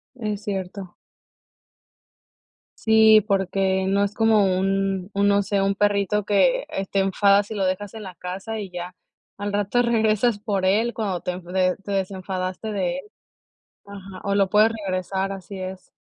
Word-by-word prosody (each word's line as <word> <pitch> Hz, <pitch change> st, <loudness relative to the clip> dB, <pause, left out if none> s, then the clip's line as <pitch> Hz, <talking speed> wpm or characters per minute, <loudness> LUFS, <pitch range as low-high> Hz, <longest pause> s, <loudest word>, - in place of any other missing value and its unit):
Es 210 Hz, -4 st, -4 dB
cierto. 190 Hz, -2 st, -5 dB, 1.9 s
Sí, 220 Hz, -1 st, +6 dB
porque 190 Hz, -1 st, +1 dB
no 200 Hz, +1 st, +2 dB
es 200 Hz, +1 st, -3 dB
como 210 Hz, -4 st, +3 dB
un 195 Hz, 0 st, -1 dB
un, 200 Hz, 0 st, +1 dB
no 200 Hz, 0 st, +4 dB
sé, 195 Hz, 0 st, 0 dB
un 195 Hz, 0 st, +1 dB
perrito 205 Hz, 0 st, +1 dB
que, -, -, +2 dB
eh, 195 Hz, 0 st, -4 dB
te 195 Hz, -, 0 dB
enfadas 200 Hz, +1 st, +3 dB
y -, -, -4 dB
lo 195 Hz, -, 0 dB
dejas 185 Hz, +2 st, -2 dB
en 215 Hz, -2 st, -8 dB
la 185 Hz, -2 st, -8 dB
casa 195 Hz, +5 st, -6 dB
y 195 Hz, -3 st, -7 dB
ya, 180 Hz, 0 st, -7 dB, 0.4 s
al 205 Hz, 0 st, -4 dB
rato 205 Hz, +4 st, +1 dB
regresas 220 Hz, -1 st, +2 dB
por 205 Hz, -3 st, -2 dB
él, 220 Hz, +5 st, +2 dB
cuando 195 Hz, -6 st, -2 dB
te 180 Hz, 0 st, -4 dB
de 185 Hz, +1 st, 0 dB
te 200 Hz, +1 st, -10 dB
desenfadaste 190 Hz, +1 st, -3 dB
de 190 Hz, +4 st, -1 dB
él -, -, -8 dB, 0.8 s
ajá, 195 Hz, -2 st, -10 dB
o 200 Hz, 0 st, 0 dB
lo 195 Hz, -2 st, +2 dB
puedes 215 Hz, +2 st, +4 dB
regresar, 190 Hz, -1 st, -2 dB
así 195 Hz, 0 st, -8 dB
es. 185 Hz, 0 st, -7 dB
195 Hz, 165 wpm, -23 LUFS, 190-210 Hz, 1.9 s, Sí